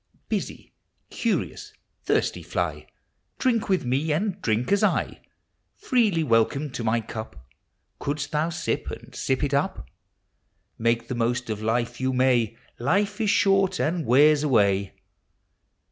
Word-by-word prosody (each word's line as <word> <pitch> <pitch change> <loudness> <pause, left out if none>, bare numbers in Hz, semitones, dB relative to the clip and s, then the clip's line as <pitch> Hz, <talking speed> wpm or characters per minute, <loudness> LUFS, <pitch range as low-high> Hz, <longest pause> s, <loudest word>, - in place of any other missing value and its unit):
Busy, - - -4 0.4
curious, - - -2 0.3
thirsty - - +1
fly, - - -3 0.5
Drink 230 -5 +1
with 185 -8 +1
me, 135 +6 0
and 190 +4 -1
drink 115 - 0
;is 200 - +3
I! - - 0 0.5
Freely 215 -10 +1
welcome 130 +4 +1
to 125 -2 -5
my 115 +1 +1
Clip, 110 0 -7 0.6
Couldst 145 0 -3
thou 155 +1 0
sij) 170 - -2
and - - -16
sip 130 +2 -1
it 145 -1 0
up: 140 - -1 0.9
Make 115 0 +1
the - - -3
most 120 0 -1
of 105 -1 -4
life 120 +2 -1
you 130 0 0
may; 125 -3 +2 0.2
Life 200 - 0
is 215 - +1
short 195 -2 +3
and 165 +2 0
wears 145 +4 +5
away! 100 -8 +2
135 Hz, 135 wpm, -25 LUFS, 115-175 Hz, 0.9 s, wears